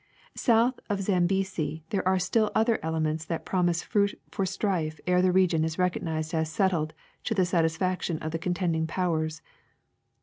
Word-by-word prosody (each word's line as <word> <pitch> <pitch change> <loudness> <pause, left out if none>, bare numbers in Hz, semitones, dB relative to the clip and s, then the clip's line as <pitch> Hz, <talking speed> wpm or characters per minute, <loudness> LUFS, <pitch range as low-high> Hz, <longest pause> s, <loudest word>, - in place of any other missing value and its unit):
South 235 +2 +2
of 205 - +1
the 195 - -3
Zambesi 185 -4 0
there 195 -2 0
are 190 0 +4
still 215 +3 +1
other 225 +1 +3
elements 160 -1 -1
that 165 0 -4
promise 175 -2 +1
fruit 200 -1 0
for 195 - -1
strife 180 -5 -1
ere 180 0 +3
the 185 0 +3
region 180 -4 +3
is 160 0 -2
recognized 165 -3 -1
as 160 -1 0
settled 160 -2 0 0.3
to 225 - -1
the 185 -2 +3
satis 165 -2 +1
faction 185 -3 -1
of 155 0 -5
the 165 - -2
contending 175 -2 0
powers. 160 -2 -1
180 Hz, 170 wpm, -27 LUFS, 160-190 Hz, 0.3 s, are